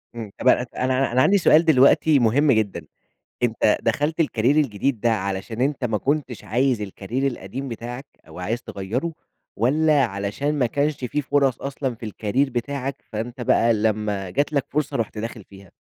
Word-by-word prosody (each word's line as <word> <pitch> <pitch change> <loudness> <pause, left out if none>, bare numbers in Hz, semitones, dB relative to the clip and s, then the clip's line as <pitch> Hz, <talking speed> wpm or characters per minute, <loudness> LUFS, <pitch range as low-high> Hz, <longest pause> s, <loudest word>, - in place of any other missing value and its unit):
امم، 110 -4 -7
طب - - -2
أن - - +8 0.2
أنا - - -2
أنا 135 -2 +1
أنا 130 +1 +3
عندي 200 +7 +5
سؤال 165 -2 +5
دلوقتي 145 0 +5
مهم 135 +6 +3
جدًا، 110 -4 0 0.6
أنت 110 -2 +2
دخلت 145 +8 0
الكاريير 135 -3 +2
الجديد 135 -3 0
ده 120 +1 +2
علشان 100 +3 -3
أنت 135 -2 0
ما 110 -2 0
كنتش 135 -4 -2
عايز 120 +1 +1
الكاريير 110 +7 -3
القديم 120 +6 -6
بتاعك 120 +4 -6 0.2
أو - - -11
عايز 115 +6 -2
تغَيَّرُه، 120 - -4 0.4
والّا 145 +5 +3
علشان 105 +9 -2
ما 125 - +3
كانش 145 +5 0
في 150 +4 -1
فرص 135 -3 +1
أصلًا 135 -3 -3
في 115 - -9
الكاريير 115 +6 -1
بتاعك، 135 +2 -3 0.2
فأنت 120 +3 -5
بقى 115 0 +3
لَمّا 105 -3 -1
جات 145 +10 -1
لك 140 -1 +1
فرصة 150 -3 -1
رُحت 110 -1 -3
داخل 110 -1 -5
فيها؟ 95 -2 -16
120 Hz, 175 wpm, -23 LUFS, 110-140 Hz, 0.6 s, أن